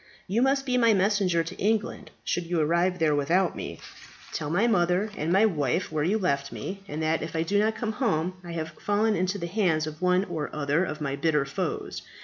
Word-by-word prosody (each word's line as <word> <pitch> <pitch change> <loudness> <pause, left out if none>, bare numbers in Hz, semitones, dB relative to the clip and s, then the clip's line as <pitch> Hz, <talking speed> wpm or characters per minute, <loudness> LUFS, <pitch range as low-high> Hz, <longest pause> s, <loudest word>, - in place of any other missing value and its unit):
You 215 +6 0
must 270 +1 +2
be 250 -1 +1
my 230 -3 +5
messenger 190 -3 +2
to 165 - -7
England, 215 +1 0
should 175 -1 -2
you 175 -1 0
arrive 170 +4 +2
there 160 -3 +2
without 170 +6 +2
me. - - -6 0.6
Tell 150 - -3
my 185 +8 +2
mother 190 -1 +2
and 160 -2 -2 0.2
wife 150 +5 0
where 155 -2 0
you 195 +7 +2
left 140 -9 -1
me, 195 +1 -6
and 155 -1 -4
that, 160 +1 +1
if 165 +1 -5
I 160 - +1
do 205 +5 +1
not 220 +1 +2
come 220 0 -2
home 185 - 0
I 170 -1 -7
have 160 -1 -4
fallen 210 +1 +2
into 185 +2 0
the 170 - -4
hands 170 -4 +1
of 155 +2 -8
one 180 +1 +3
or 160 -6 -4
other 150 +3 +1
of 155 -4 -4
my 140 -2 -1
bitter 150 -1 +1
foes. 135 - -3
175 Hz, 215 wpm, -27 LUFS, 155-205 Hz, 0.6 s, my